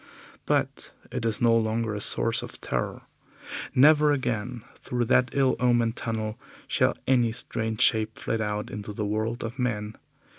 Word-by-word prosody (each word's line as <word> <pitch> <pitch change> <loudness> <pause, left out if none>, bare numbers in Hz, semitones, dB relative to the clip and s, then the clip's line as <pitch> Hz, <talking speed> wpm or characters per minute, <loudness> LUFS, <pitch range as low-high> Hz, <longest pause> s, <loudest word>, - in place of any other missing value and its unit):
But - - -1 0.2
it 125 -2 -3
is 110 - -2
no 115 -1 +5
longer 110 0 0
a 105 - -4
source 115 +1 +2
of - - -9
terror. - - -3 0.7
Never 150 +2 +6
again 120 -3 -2 0.2
through 120 -1 -2
that 125 +1 +3
ill 135 -2 +3
omened 120 -2 +2
tunnel 110 -1 -3 0.3
shall - - +2
any 120 -3 +3
strange 110 -2 -3
shape 110 -1 +4
flit 115 -1 -2
out 105 -1 -3
into 105 0 -6
the 105 +1 -3
world 110 +3 -2
of 115 +4 -6
men. 110 -4 -2
115 Hz, 155 wpm, -26 LUFS, 110-125 Hz, 0.7 s, Never